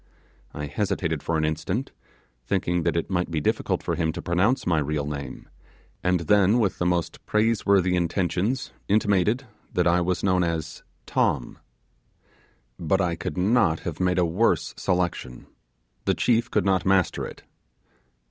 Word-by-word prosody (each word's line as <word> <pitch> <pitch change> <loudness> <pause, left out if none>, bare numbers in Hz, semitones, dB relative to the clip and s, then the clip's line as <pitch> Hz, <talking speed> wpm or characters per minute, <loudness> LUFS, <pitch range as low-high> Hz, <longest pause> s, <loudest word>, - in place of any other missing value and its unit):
I 75 - -5
hesitated 80 -3 -2
for 85 - -1
an 80 - +1
instant, 95 - -2 0.6
thinking 90 0 0
that 85 0 0
it 85 +3 -2
might 90 -1 0
be 80 -2 -1
difficult 75 - -1
for - - -1
him 80 -2 0
to 85 - -6
pronounce 95 +9 +1
my 85 -3 +2
real 75 0 -1
name, 70 -1 -6 0.6
and 90 -1 +2
then 100 +5 +4
with 105 -6 0
the 90 - +1
most 90 -2 -1
praiseworthy 100 -4 +2
intentions 90 +7 -1
intimated 105 +4 +2 0.3
that 90 - +1
I 85 +1 +3
was 90 +1 -1
known 90 -2 +3
as 85 -3 -3 0.2
'Tom'. 65 -5 0 1.2
But 90 +3 +1
I 90 -3 +1
could 85 - -5
not 95 -4 +2
have 85 -3 -5
made 90 0 +1
a 90 - +3
worse 90 +8 +1
selection; 90 -8 -2 0.6
the - - +2
chief 120 -1 +2
could 105 - +1
not 95 -3 +2
master 95 -1 +2
it. - - -12
90 Hz, 155 wpm, -25 LUFS, 85-100 Hz, 1.2 s, then